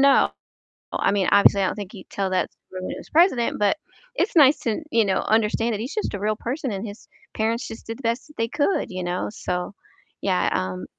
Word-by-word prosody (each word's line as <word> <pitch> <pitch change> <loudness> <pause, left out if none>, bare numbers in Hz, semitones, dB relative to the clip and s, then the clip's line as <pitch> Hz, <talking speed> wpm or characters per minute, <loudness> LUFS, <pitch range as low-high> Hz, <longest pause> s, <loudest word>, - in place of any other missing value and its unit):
know. 275 0 +5 0.6
I - - +2
mean, 200 -3 +1
obviously 200 0 +6
I 190 - +2
don't - - -2
think 205 -1 -7
he'd 190 -4 -11
tell 195 -1 -1
that 185 - 0
story 185 0 -10
when - - -3
he - - -5
was - - -11
president, 310 - +3
but 205 +8 +3 0.4
it's 430 - 0
nice 290 -2 +7
to, 230 +6 -1
you 230 -5 +4
know, 190 -1 +1
understand 225 +1 +2
that 205 - -2
he's 245 +6 -4
just 430 - -2
a 200 - -3
real 215 +2 0
person 260 +4 -3
and 200 +2 -4
his 205 0 -9 0.3
parents 225 +2 0
just 225 - -10
did 225 - -5
the - - -9
best 235 +4 -1
that 300 - -18
they 230 0 0
could, 295 +10 +1
you 185 -1 -4
know? 175 +2 -2
So 180 -1 -3 0.5
yeah, 185 -2 +2
um 95 -1 -2
215 Hz, 235 wpm, -24 LUFS, 195-240 Hz, 0.6 s, nice